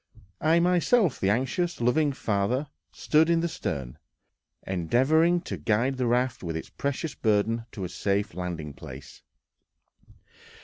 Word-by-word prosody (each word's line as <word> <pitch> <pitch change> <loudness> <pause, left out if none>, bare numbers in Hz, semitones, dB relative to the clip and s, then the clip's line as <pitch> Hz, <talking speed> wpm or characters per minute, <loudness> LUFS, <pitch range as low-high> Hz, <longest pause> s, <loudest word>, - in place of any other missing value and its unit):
I 160 +2 +4
myself, 180 - +3
the 95 - +1
anxious, 135 - 0
loving 145 +5 +2
father, 125 +4 -1 0.2
stood 155 +2 +2
in 165 -1 +3
the 170 - 0
stern, 70 - -5 0.7
endeavoring 135 - +2
to 100 - -5
guide 115 - 0
the 125 -2 0
raft 125 +1 +1
with 80 -3 -3
its - - -7
precious 140 +2 -3
burden 115 +1 0
to 100 - -6
a 90 - -3
safe 100 +4 -1
landing 85 -5 -5
place. 70 +1 -11
120 Hz, 135 wpm, -27 LUFS, 95-155 Hz, 0.7 s, I